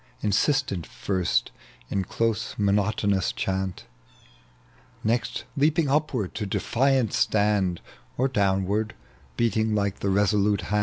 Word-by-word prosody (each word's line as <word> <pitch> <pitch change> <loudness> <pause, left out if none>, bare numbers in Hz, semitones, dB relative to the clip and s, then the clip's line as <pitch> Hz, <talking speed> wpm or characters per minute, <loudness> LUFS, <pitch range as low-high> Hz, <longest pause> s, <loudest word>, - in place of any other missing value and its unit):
Insistent 105 - +1
first 90 -11 -1 0.4
in 95 -1 0
close 115 +2 -1
monotonous 100 -1 +1
chant, 95 -1 -3 1.2
Next 115 +1 -1
leaping 150 +1 +2
upward 135 -9 0
to 105 -3 -3
defiant 130 +3 +1
stand 100 -4 +1 0.4
Or 130 - +2
downward 100 -1 0 0.4
beating 110 -1 +1
like 100 -1 -1
the 100 - -1
resolute 100 0 +2
hand 105 +1 0
105 Hz, 105 wpm, -25 LUFS, 95-115 Hz, 1.2 s, leaping